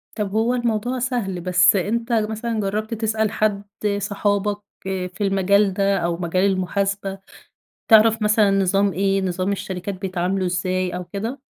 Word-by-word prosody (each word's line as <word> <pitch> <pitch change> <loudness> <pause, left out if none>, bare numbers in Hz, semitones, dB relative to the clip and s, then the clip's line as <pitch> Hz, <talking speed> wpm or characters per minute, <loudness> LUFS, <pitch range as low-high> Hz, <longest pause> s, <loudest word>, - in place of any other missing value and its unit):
طب 205 -3 -2
هو 225 +3 +1
الموضوع 240 +1 -1
سهل، 230 -8 -2
بس 180 +2 +4
أنت 230 +5 -1
مثلًا 220 +1 -1
جربت 215 +3 -2
تسأل 220 -1 0
حد، 205 -2 0 0.4
صحابك، 205 0 -1 0.3
آآ، 185 -1 -2
في 190 +3 -13
المجال 195 0 +2
ده 195 0 +1
أو 170 -1 -1
مجال 185 +2 0
المحاسبة 195 +1 -2 0.7
تعرف 220 0 +6
مثلًا 210 -1 +3
نظام 195 0 +2
إيه، 195 +1 +1
نظام 185 +1 -1
الشركات 190 0 -4
بيتعاملوا 185 0 -2
إزاي 180 0 -1
أو 180 - -4
كده؟ 225 +8 -5
200 Hz, 145 wpm, -22 LUFS, 185-215 Hz, 0.7 s, تعرف